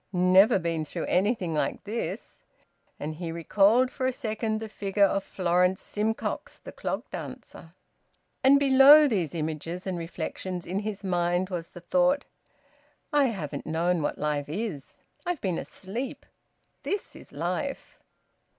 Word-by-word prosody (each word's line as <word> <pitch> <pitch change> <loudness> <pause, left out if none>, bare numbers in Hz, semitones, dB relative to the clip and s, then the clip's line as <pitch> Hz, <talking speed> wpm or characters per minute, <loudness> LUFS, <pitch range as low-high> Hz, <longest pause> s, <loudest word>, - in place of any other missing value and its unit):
Never 185 +2 +5
been 165 -3 -1
through 160 +2 -5
anything 190 -3 +1
like 150 - -1
this!" 205 -2 -5 0.6
And 155 +1 -5
he 170 -1 -4
recalled 205 +9 +3
for 260 - -1
a - - +2
second 220 -3 -2
the 220 - -5
figure 200 -1 +1
of 195 0 0
Florence 180 +1 +1
Simcox, 220 +2 -3
the - - -10
clog - - -4
dancer. - - -9 0.7
And 275 +2 +7
below 280 +2 +8
these 180 - -1
images 160 +3 -4
and 185 -2 -2
reflections 175 +1 -5
in 190 +3 -2
his 210 -1 -5
mind 175 0 0
was 170 -2 -4
the 175 - -12
thought: 270 +9 +2 0.9
"I 290 -1 +5
haven't 190 - -4
known 170 +2 +1
what 145 - -2
life 150 -1 -2
is! 170 -5 -5 0.2
I've 355 -4 -2
been 185 -6 -1
asleep. 225 +8 -6 0.6
This 405 - -3
is - - -13
life!" - - -4
190 Hz, 140 wpm, -27 LUFS, 170-225 Hz, 0.9 s, below